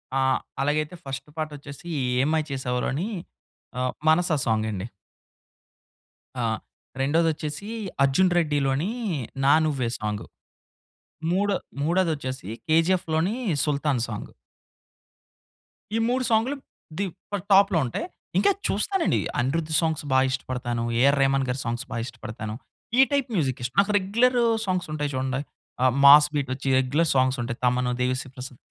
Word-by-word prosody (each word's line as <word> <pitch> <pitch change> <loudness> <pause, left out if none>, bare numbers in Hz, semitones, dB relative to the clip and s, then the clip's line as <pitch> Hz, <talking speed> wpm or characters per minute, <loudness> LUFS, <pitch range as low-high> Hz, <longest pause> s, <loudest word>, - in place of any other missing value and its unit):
ఆ! - - +2 0.4
అలాగైతే 155 +4 0
ఫస్ట్ 135 +2 -6
పాటొచ్చేసి 145 0 -6 0.3
'ఏం 140 +3 +2
మాయ 155 -1 +2
చేశావె' 125 -2 -2
లోని 160 +10 -1 0.7
ఆహ్, 125 0 0 0.2
'మనస' 165 +1 +4
సాంగ్ 110 -1 +1
అండి. 100 +2 -4 1.6
ఆ! - - +1 0.6
రెండోదొచ్చేసి 155 +4 0 0.4
'అర్జున్ 175 +7 +3
రెడ్డి' 150 -4 +2
లోని 145 +10 0 0.5
'నా 140 - +6
నువ్వే' 130 -6 -1
సాంగు. 105 -1 -3 1.0
మూడో 200 +2 +2 0.3
మూడోదొచ్చేసి 150 - -1 0.2
'కేజీఎఫ్‌' 165 +1 +2
లోని 175 +8 +1 0.3
'సుల్తాన్' 140 -4 0
సాంగ్. 105 -3 -6 1.6
ఈ - - +2
3 255 +1 +1
సాంగులు 230 +6 +2 0.4
ది 200 - +1 0.3
ప - - 0 0.2
టాప్‌లో 195 -2 +6
ఉంటాయి. 125 - -3 0.3
ఇంకా 400 - +5 0.2
చూస్తానండి 385 -4 +1 0.2
అనిరుద్ 155 +5 -1
సాంగ్స్ 160 -2 0
బా 130 - +4
ఇష్టపడతాను. 125 -2 -3 0.2
ఏఆర్ 140 +1 +5
రెహమాన్‌గారి 135 -1 +1
సాంగ్స్ 120 +3 -3
బా 120 - -3
ఇష్టపడతాను. 110 -3 -7 0.4
ఈ - - +10
టైప్ 275 -3 +1
మ్యూజిక్ 135 -8 0
ఇష్టం. 120 - -4
నాకు 210 +1 -1
రెగ్యులర్ 235 +6 +2 0.3
సాంగ్స్ 185 -3 -1
ఉంటాయి 145 -1 -1
చూడండి. 130 +1 -1 0.4
ఆహ్, 130 -2 +4
మాస్ 145 +1 +10
బీట్ 135 -3 -1
ఒచ్చి 135 +1 -7
రెగ్యులర్ 145 +5 +1
సాంగ్స్ 130 0 +3
ఉంటాయి. 115 0 -5
తమన్, 125 0 +2
దేవిశ్రీ 130 +1 -1
ప్రసాద్ 125 -1 -9
145 Hz, 130 wpm, -25 LUFS, 130-170 Hz, 1.6 s, ఈ